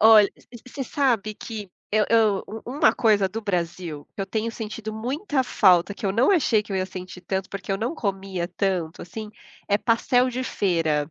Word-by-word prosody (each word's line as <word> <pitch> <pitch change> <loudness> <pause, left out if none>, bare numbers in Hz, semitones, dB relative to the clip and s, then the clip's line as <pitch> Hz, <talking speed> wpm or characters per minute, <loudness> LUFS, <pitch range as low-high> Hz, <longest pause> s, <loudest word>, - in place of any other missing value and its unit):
Olh 215 -2 +8
v - - -12 0.4
você 270 +1 -5
sabe 230 -7 +1
que 210 -5 -7 0.2
eu 215 -1 +4
eu 220 -4 +3
u 220 +1 -7
uma 290 +5 +3
coisa 210 -5 +3
do 225 +4 -5
Brasil 170 -5 -3
que - - -6
eu 195 - -2
tenho 220 +3 -2
sentido 220 -1 -5
muita 265 - -1
falta, 185 -4 +4
que - - -10
eu 190 - +1
não 245 - +4
achei 255 - +3
que 205 - -17
eu - - 0
ia 185 - +1
sentir 185 -1 -8
tanto, 190 +1 -2
porque 195 0 -4
eu - - +1
não 240 +9 -2
comia 195 - -2
tanto 180 -6 -1
assim, 210 +4 -7 0.4
é 205 - +4
pastel 245 +3 +2
de 255 +1 -3
feira. 160 - 0
210 Hz, 200 wpm, -24 LUFS, 190-230 Hz, 0.4 s, Olh